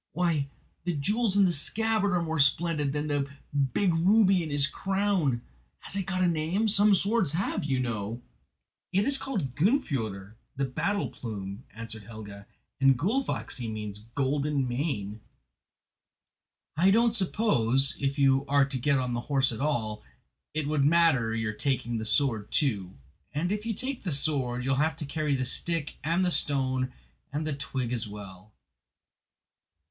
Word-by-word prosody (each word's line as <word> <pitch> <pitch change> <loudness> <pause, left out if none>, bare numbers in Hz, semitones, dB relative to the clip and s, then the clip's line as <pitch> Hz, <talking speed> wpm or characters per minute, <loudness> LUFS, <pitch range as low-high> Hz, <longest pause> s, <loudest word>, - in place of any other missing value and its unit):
Why, 160 -5 0 0.3
the 175 - -1
jewels 205 +8 0
in 200 - +6
the 180 - +3
scabbard 210 +5 +1
are 175 -1 +1
more 160 -1 -2
splendid 150 0 +2
than 145 +1 -2
the 145 -2 -1 0.4
big 190 -4 +2
ruby 190 +2 +4
in 160 - -4
his 145 -1 +4
crown! 190 -8 0 0.4
Has - - -6
it 195 -2 -2
got 185 -1 0
a - - +4
name? 170 +6 0
Some 205 0 +5
swords 200 -5 +1
have, 180 +5 -1
you 135 -3 0
know." 115 -2 -3 0.7
"It 195 +2 +2
is 275 0 +4
called 185 - -3
'Gunnfjoder,' 130 - -1 0.2
the 135 - 0
'Battle 200 +10 -1
Plume,'" 100 -1 -7
answered 110 -1 -7
Helga, 105 -2 -10 0.3
"and 135 -1 +5
'Gullfaxi' 175 - -2
means 105 -1 -5 0.2
'Golden 140 0 0
Mane.' 120 -6 -3 1.5
I 175 +5 +4
don't 230 +3 +4
suppose, 140 - +3
if 140 0 -1
you 135 -1 +3
are 140 -1 +4
to 135 -1 -4
get 140 +3 +2
on 125 -1 -1
the 120 - -2
horse 135 -2 +3
at 115 - -6
all, 110 -8 -1 0.5
it 155 -2 -1
would 150 -2 +1
matter 145 -8 +4
your 110 -1 -2
taking 120 -1 -1
the 110 - -4
sword 110 -4 +2
too. 100 - 0 0.4
And 165 +6 -1
if 210 +2 -3
you 225 - -1
take 260 +3 -3
the 180 - -3
sword 135 -4 +1
you 135 - 0
will 135 - +1
have 155 +1 +1
to 155 - -5
carry 150 0 -1
the 130 -1 -1
stick 165 +3 0
and 170 +4 +1
the 180 - +1
stone 130 -4 +1 0.4
and 150 +2 -3
the 155 - -2
twig 130 -3 -3
as 115 -2 0
well." 100 -1 -11
145 Hz, 165 wpm, -28 LUFS, 120-180 Hz, 1.5 s, in